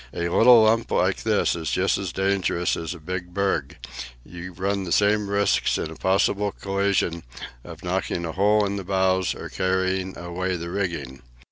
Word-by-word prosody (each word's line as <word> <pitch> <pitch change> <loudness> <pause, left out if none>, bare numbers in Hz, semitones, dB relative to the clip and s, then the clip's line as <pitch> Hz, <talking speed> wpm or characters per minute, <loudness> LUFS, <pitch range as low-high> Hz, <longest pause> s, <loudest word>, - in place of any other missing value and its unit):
A 85 0 -1
little 115 +4 +7
lump 115 +1 +2
like - - +1
this - - +1
is 80 -2 -4
just 95 +1 +1
as 95 -2 -4
dangerous 95 -2 0
as 85 +1 -5
a - - -11
big 90 +2 -6
berg; 95 -8 -1 0.5
you 90 +1 -9
run 95 +3 -2
the 90 - -6
same 105 +1 +2
risks 100 0 +1
in - - -4
a - - -9
possible 100 +2 +1
collision 100 -3 -1 0.4
of - - -11
knocking 85 - -2
a 80 - -3
hole 105 +3 +3
in 100 0 -2
the 100 - -5
bows 95 -1 +1
or - - -7
carrying 95 0 -1
away 90 +2 -3
the 85 0 -5
rigging. 85 -10 -3
95 Hz, 175 wpm, -24 LUFS, 85-100 Hz, 0.5 s, little